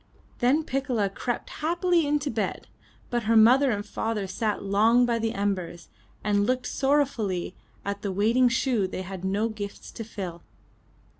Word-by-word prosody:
Then 270 +6 +3
Piccola 255 -8 -1
crept 240 +4 -4
happily 345 0 +2
into 290 0 0
bed, 215 -4 -2 0.5
but 240 -2 -1
her 225 +1 +4
mother 255 +5 +6
and 205 -3 -1
father 220 -3 -2
sat 210 +2 -2
long 220 +5 +4
by 235 -1 0
the 225 0 -1
embers, 185 -4 -3 0.3
and 205 0 +2
looked 255 0 0
sorrow 285 +2 +2
fully 195 -9 -4 0.3
at 200 0 -3
the 200 - -2
waiting 230 +6 +3
shoe 235 -4 +1
they 185 0 -5
had 190 0 -7
no 200 +4 +1
gifts 205 -2 -7
to 225 - -6
fill. 185 -6 -6
220 Hz, 160 wpm, -26 LUFS, 200-255 Hz, 0.5 s, mother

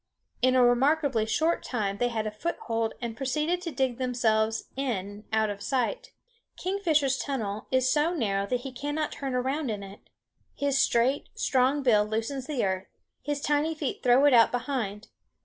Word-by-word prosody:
In 255 0 +4
a 255 - +6
remarkably 260 -1 +2
short 320 +9 +1
time 205 -5 -2
they 245 - +2
had 225 -2 -2
a 215 - -2
foothold 225 -3 -2
and 230 -1 -3
proceeded 300 +7 -1
to 340 -2 -4
dig 260 -2 -1
themselves 225 -3 +1
in 210 -6 -3
out 220 -1 +2
of 200 0 -8
sight. 275 - -1 0.5
Kingfisher's 320 -8 +1
tunnel 215 -7 -3
is 260 -1 +2
so 300 +3 +2
narrow 200 - -1
that 250 +1 -1
he 270 - -6
cannot 290 +4 -3
turn 270 -2 -4
around 265 +3 -1
in 205 -2 -3
it. 195 +1 -10 0.6
His 280 -1 +1
straight, 245 +4 +2
strong 265 +2 +2
bill 215 -5 +5
loosens 225 +5 -3
the 275 -8 0
earth; 190 0 -2 0.3
his 290 -1 -3
tiny 295 +2 +1
feet 295 -4 -3
throw 250 +3 +5
it 290 - +6
out 230 -2 +6
behind. 230 -5 -3
255 Hz, 170 wpm, -27 LUFS, 220-285 Hz, 0.6 s, a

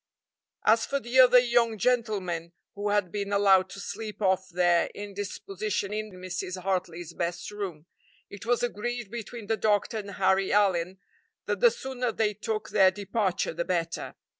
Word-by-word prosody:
As 225 +1 +5
for 280 - -1
the 250 +1 0
other 250 -1 +8
young 240 -2 +3
gentlemen, 195 -8 0 0.2
who 205 +1 -3
had 205 -4 +1
been 200 -1 -3
allowed 195 -2 +4
to 200 - -9
sleep 215 +1 -6
off 190 -2 +1
their 175 -1 +3
indisposition 205 0 -4
in 215 0 -3
Mrs. 185 0 -5
Hartley's 175 -3 -2
best 175 +4 -3
room, 190 -7 -6 0.4
it 200 - -10
was 240 +1 +1
agreed 240 -1 -3
between 235 -1 -7
the 220 +1 0
doctor 215 +1 +1
and 200 -1 -7
Harry 190 0 +2
Allyn 190 -3 +2 0.5
that - - -1
the 485 - +7
sooner 260 - -3
they 215 -1 0
took 215 +1 -4
their 190 -3 +6
departure 200 -1 -1
the 170 +1 -2
better. 170 -2 -2
205 Hz, 160 wpm, -28 LUFS, 185-225 Hz, 0.5 s, other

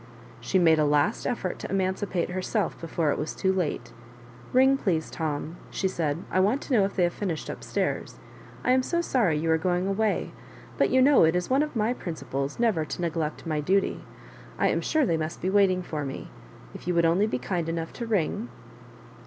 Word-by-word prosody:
She 190 - 0
made 165 -3 +5
a - - +4
last, 150 +8 +1
effort 190 -7 -2
to - - -6
emancipate 190 -2 -1
her 185 +1 -2
self - - -1
before 165 -2 0
it - - -2
was 150 - -3
too 190 -1 +1
late. 155 -9 -2 0.3
" 120 0 -19
Ring, 265 +2 +5
please, 175 - -1
Tom," 155 +1 -3
she 190 - -1
said; 165 -3 -2
" - - -19
I 185 - +2
want 215 +9 +2
to 275 - -3
know 210 -5 +5
if 195 - -5
they 180 - +2
have 175 0 +1
finished 175 -7 -3
up - - -9
stairs. - - -2 0.5
I 250 - +2
am 260 0 +4
so 340 +6 0
sorry 220 - +1
you 160 +2 0
are 160 - +3
going 180 +2 0
away; 205 +2 0 0.4
but - - +2
you 260 0 +4
know 280 -5 +6
it 160 +1 +4
is 180 +6 -1
one 270 +2 +4
of 300 -2 -2
my 225 +2 +1
principles 145 - -4
never 220 -9 +2
to 155 - -5
neglect 160 -2 -2
my 155 -2 -1
duty. 190 +6 +1 0.5
I - - +2
am - - 0
sure 310 -2 +2
tliey 165 -7 +1
must 155 +1 -4
be 185 - -1
waiting 190 -2 +3
for 155 -4 -4
me 135 -1 -6 0.2
— - - -20
if - - -10
you 180 - +1
would 170 0 +4
only 180 +6 +3
be 170 - -1
kind 165 +6 -2
enough 165 0 -3
to 235 - -5
ring." 210 +2 -1
180 Hz, 225 wpm, -27 LUFS, 160-205 Hz, 0.5 s, know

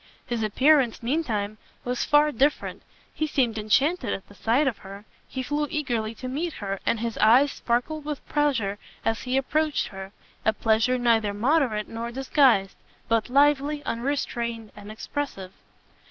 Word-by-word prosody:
His 240 -2 -2
appearance, 255 +3 +3
meantime, 220 -7 -1 0.2
was 250 0 -1
far 300 0 +4
different; 280 +4 0 0.3
he 310 - -1
seemed 240 -7 0
enchanted 255 - +1
at 195 - -6
the - - -15
sight 235 +8 +1
of 260 -6 -1
her, 200 +2 -11 0.2
he 260 - -4
flew 295 +3 -1
eagerly 240 -8 -2
to 255 - -7
meet 310 +6 -3
her, 195 -2 -4
and 230 - +2
his 235 -1 -3
eyes 250 +7 +5
sparkled 250 +6 -2
with 300 -1 -6
pleasure 235 -10 0 0.3
as 225 0 0
he 255 +1 -1
approached 305 +3 0
her; 195 0 -8 0.3
a 220 - +3
pleasure 225 +3 +2
neither 225 -4 +2
moderate 240 -2 +1
nor 230 +1 -5
disguised, 260 -6 +3 0.3
but 230 0 +1
lively, 290 +2 +3
unrestrained, 235 -3 -3
and 205 0 -10
expressive. 215 -4 -5
240 Hz, 155 wpm, -25 LUFS, 220-290 Hz, 0.3 s, eyes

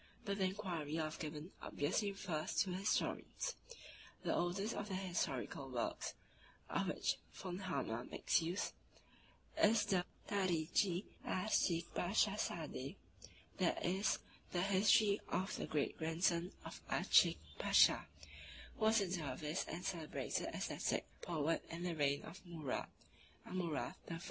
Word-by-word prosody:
But 200 0 -1
the 190 - +4
inquiry 175 -6 -2
of 155 -1 -2
Gibbon 155 +2 -5
obviously 185 +8 0
refers 180 -6 -3
to 190 - -4
historians. 200 - 0 0.7
The - - +1
oldest 195 +6 0
of 205 - -3
their 190 - -1
historical 145 -7 -2
works, 120 -2 -2 0.6
of - - +1
which - - +1 0.2
V. 180 -2 -5
Hammer 135 - -2
makes - - +2
use, 170 +4 -1 0.9
is 210 0 +6
the 185 -2 +2 0.2
"Tarichi 180 -1 +2 0.2
Aaschik 180 -3 +2
Paschasade," 175 -8 0 0.6
i. - - +3
e. 190 +3 0 0.5
the 175 - +1
History 200 +1 +5
of 190 +1 0
the - - -3
Great 150 -2 0
Grandson 170 +2 +1
of - - -7
Aaschik - - +5 0.2
Pasha, - - +6 0.7
who 220 - +2
was 220 0 +5
a 195 - +1
dervis 155 -2 -2
and 180 +2 -5
celebrated 165 -5 -2
ascetic - - -1 0.2
poet 165 -1 0
in 170 +1 -5
the 180 -1 0
reign 140 -2 +2
of 175 +4 -10
Murad 160 -7 -3 0.6
(Amurath) 175 -5 -2 0.2
I. 165 -1 -3
175 Hz, 130 wpm, -39 LUFS, 155-195 Hz, 0.9 s, is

